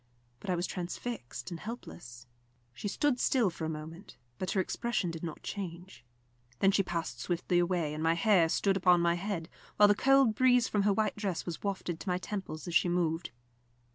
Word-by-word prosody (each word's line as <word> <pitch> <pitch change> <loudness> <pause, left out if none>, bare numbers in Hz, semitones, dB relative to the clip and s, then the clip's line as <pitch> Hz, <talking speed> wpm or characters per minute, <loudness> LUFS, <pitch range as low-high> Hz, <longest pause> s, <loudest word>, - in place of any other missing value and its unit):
But 200 - -8
I 180 - +2
was 175 +1 -1
transfixed 180 - -5
and 170 - -5
helpless. 175 - -9 0.5
She 205 - -5
stood 255 +5 +1
still 235 -8 +2
for 165 -1 -5
a - - -2
moment, 160 +3 -8 0.2
but 185 - -2
her 195 - +1
expression 205 -1 -1
did 165 -1 -7
not 165 -3 -6
change. 180 - -7 0.5
Then 195 - +4
she 195 - +3
passed 170 -3 -3
swiftly 175 0 0
away, 175 -4 0
and 155 - -4
my 165 +1 +3
hair 175 -2 +4
stood 195 +3 +2
up 185 - -7
on 180 -1 +7
my 170 0 +3
head, 175 -2 -3 0.3
while 210 - +8
the 205 - +6
cold 270 +1 +4
breeze 250 0 +4
from 205 - +1
her - - +5
white 215 +2 0
dress 195 -5 -2
was 170 -2 -5
wafted 185 -4 -3
to 195 - -5
my 180 - +1
temples 185 -5 -5
as 175 - -4
she 175 - +4
moved. 170 -1 0
180 Hz, 200 wpm, -31 LUFS, 165-205 Hz, 0.5 s, while